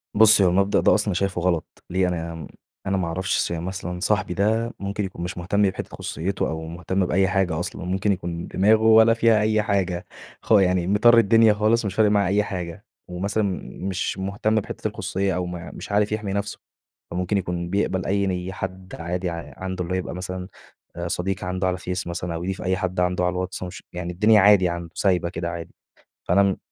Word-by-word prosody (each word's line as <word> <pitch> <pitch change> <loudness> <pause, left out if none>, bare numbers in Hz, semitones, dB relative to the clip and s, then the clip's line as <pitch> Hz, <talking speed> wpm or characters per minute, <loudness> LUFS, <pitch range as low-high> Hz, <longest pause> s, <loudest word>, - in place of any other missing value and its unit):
بُصّي، 110 -1 +7
هو - - +5
المبدأ 100 +3 +2
ده - - +4
أصلًا 105 0 +2
أنا 100 - +1
شايفه 95 0 -1
غلط، 85 -2 -2
ليه؟ 95 0 +1
أنا 85 -3 -4 0.4
أنا 95 - +1
ما 90 -3 -1
أعرفش 95 +3 -1
ص - - 0
يعني 85 0 -3
مثلًا 90 -1 -5
صاحبي 100 -2 0
ده 110 +4 0
ممكن 100 +1 -3
يكون 90 -2 -7
مش 90 +2 -5
مهتم 95 +4 0
بحتّة - - -6
خصوصيته 90 +6 -2
أو 80 0 -4
مهتم 90 +3 -1
بأي 95 +2 +2
حاجة 90 -4 0
أصلًا، 90 - -4
ممكن 95 +3 0
يكون 85 -2 -4
دماغه 110 +3 +3
ولا 110 0 +6
فيها 115 -1 +3
أي 110 0 +2
حاجة، 95 -4 -1 0.4
خ - - -8
يعني 90 -4 +4
مِطرِّي 115 +4 +6
الدنيا 110 0 +5
خالص، 110 +2 +2
مش 100 -1 -3
فارق 110 -2 +4
معاه 100 -3 +3
أي 100 +2 +2
حاجة 90 -4 -6 0.2
ومثلًا 100 +4 -1 0.4
مش 95 0 -2
مهتم 100 +3 -1
بحتّة 110 - -2
الخصوصية 95 -1 -2
أو 90 0 -1
م 90 -1 -7
مش - - -8
عارف 105 +1 +2
يحمي 105 -2 -2
نفسه، 100 0 -3 0.5
فممكن 90 +3 -1
يكون 85 -2 -3
بيقبل 95 -1 0
أي 100 0 +1
ني 90 0 -3
حد 95 0 -6
عادي 90 +2 -2
ع 85 0 -7
عنده 95 -1 -4
اللي 90 +2 -4
هو - - +1
يبقى 90 - -5
مثلًا 90 0 -5 0.5
أ 85 0 -4
صديق 90 +2 -2
عنده 90 +1 -1
على 90 - +1
الفيس 90 -1 -4
مثلًا 85 0 -3
أو 85 - -4
يضيف 95 +1 -3
أي 95 0 0
حد 95 -2 -2
عنده 90 0 +1
على 90 - +2
الواتس 95 0 -4
ومش 90 -1 -8
يعني 90 0 -4
الدنيا 105 +3 +5
عادي 95 -2 +6
عنده، 85 -1 -5
سايبة 90 -3 +1
كده 85 0 -4
عادي، 85 -1 -7 0.5
فأنا 100 +3 +4
م 100 -1 +2
95 Hz, 210 wpm, -23 LUFS, 90-100 Hz, 0.5 s, بُصّي